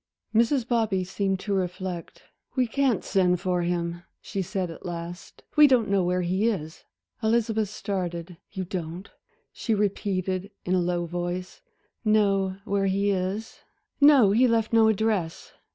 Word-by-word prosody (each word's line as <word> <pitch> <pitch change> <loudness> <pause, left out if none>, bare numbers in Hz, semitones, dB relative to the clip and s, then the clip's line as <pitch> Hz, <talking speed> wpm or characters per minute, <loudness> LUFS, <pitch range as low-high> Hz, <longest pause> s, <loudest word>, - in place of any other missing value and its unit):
Mrs. 235 +2 +2
Bobby 220 -6 +1
seemed 195 +1 -1
to 205 - -2
reflect. 185 -2 -4 0.3
"We 255 -2 +3
can't 250 -2 +1
send 180 -2 +2
for 180 0 0
him," 170 0 -2 0.2
she 195 - -4
said 185 -1 -3
at 165 - -11
last, 175 0 -7
"we 300 -1 +8
don't 245 -6 +3
know 195 -2 +3
where 180 +1 0
he 190 +5 +1
is." 160 -7 -5 0.4
Elizabeth 220 -2 +1
started. 180 -4 -4
"You 190 -2 -4
don't," 175 +1 -6 0.4
she 225 - -1
repeated, 195 -2 -1 0.2
in 180 - 0
a 185 - +3
low 175 0 -1
voice, 175 +2 -4 0.4
"know 200 -3 +2
where 200 -1 +1
he 200 +1 +1
is?" 195 +4 -3 0.4
"No, 280 -8 +7
he 245 +5 +4
left 230 -1 +1
no 225 -1 +6
address. 215 -6 -1
195 Hz, 150 wpm, -26 LUFS, 180-220 Hz, 0.4 s, we